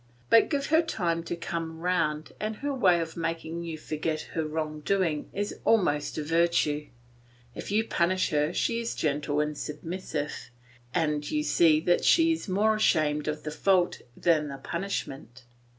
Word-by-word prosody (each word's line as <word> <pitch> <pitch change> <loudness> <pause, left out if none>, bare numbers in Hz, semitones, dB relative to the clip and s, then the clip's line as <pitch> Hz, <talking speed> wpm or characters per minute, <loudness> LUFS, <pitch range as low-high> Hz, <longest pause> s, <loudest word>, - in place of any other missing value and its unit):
But 230 - +6
give 280 -2 0
her 320 - +7
time 175 - -1
to 175 - -3
come 165 -1 -5
round 160 -3 0
and 215 +1 -2
her 285 +5 -3
way 185 -10 +4
of 165 -1 -5
making 165 0 -3
you 165 -2 -5
forget 155 0 -3
her 160 - 0
wrong 155 0 -3
doing 165 -3 0
is 205 +1 -4
almost 175 -10 +2
a 155 - -1
virtue. 165 -2 +1 0.7
If - - -7
you 215 +2 +2
punish 185 +2 +1
her 150 +1 +1
she 230 +5 0
is 230 0 -3
gentle 145 0 0
and 150 0 0
submissive, 150 0 -5 0.4
and 150 -2 0
you 150 0 0
see 155 +1 +4
that 175 +1 +2
she 330 -1 +5
is 325 -10 -3
more 210 +4 +3
ashamed 155 -8 +2
of 150 0 -3
the 155 - -4
fault 180 +3 +2 0.2
than 160 -3 +2
the 140 -1 -6
punishment. 135 - -5
165 Hz, 165 wpm, -28 LUFS, 150-185 Hz, 0.7 s, her